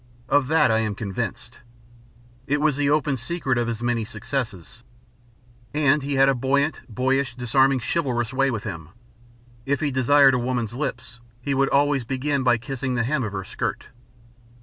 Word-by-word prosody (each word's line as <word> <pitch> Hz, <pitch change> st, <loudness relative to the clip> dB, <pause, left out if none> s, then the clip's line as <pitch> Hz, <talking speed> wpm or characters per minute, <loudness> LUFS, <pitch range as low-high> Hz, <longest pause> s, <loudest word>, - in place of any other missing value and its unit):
Of 145 Hz, -2 st, +2 dB
that 150 Hz, -5 st, +4 dB
I 110 Hz, -, +3 dB
am 110 Hz, -2 st, -1 dB
convinced. 115 Hz, +3 st, -5 dB, 0.9 s
It 145 Hz, +2 st, +1 dB
was 150 Hz, -1 st, +2 dB
the 145 Hz, 0 st, +1 dB
open 150 Hz, -2 st, +1 dB
secret 135 Hz, -1 st, -1 dB
of 120 Hz, -, -1 dB
his 115 Hz, 0 st, -4 dB
many 120 Hz, -1 st, 0 dB
successes. 115 Hz, -, -5 dB, 0.9 s
And 150 Hz, 0 st, +3 dB
he 140 Hz, +1 st, -2 dB
had 135 Hz, 0 st, +5 dB
a 135 Hz, -, +4 dB
buoyant, 140 Hz, +4 st, 0 dB
boyish, 130 Hz, +2 st, 0 dB
disarming, 130 Hz, +2 st, +2 dB
chivalrous 125 Hz, -6 st, -1 dB
way 135 Hz, +1 st, +2 dB
with 115 Hz, -4 st, -3 dB
him. 85 Hz, -8 st, -7 dB, 0.7 s
If 140 Hz, +2 st, 0 dB
he 150 Hz, -2 st, -1 dB
desired 135 Hz, +1 st, +5 dB
a 125 Hz, -, +1 dB
woman's 120 Hz, -3 st, -2 dB
lips 120 Hz, -3 st, -5 dB, 0.2 s
he 140 Hz, +3 st, -2 dB
would 135 Hz, 0 st, +2 dB
always 145 Hz, -1 st, +2 dB
begin 135 Hz, +3 st, -1 dB
by 125 Hz, -2 st, +3 dB
kissing 130 Hz, +1 st, -4 dB
the 115 Hz, -, +1 dB
hem 135 Hz, +2 st, 0 dB
of 105 Hz, -2 st, -4 dB
her 95 Hz, -1 st, -3 dB
skirt. -, -, -4 dB
130 Hz, 170 wpm, -23 LUFS, 120-140 Hz, 0.9 s, had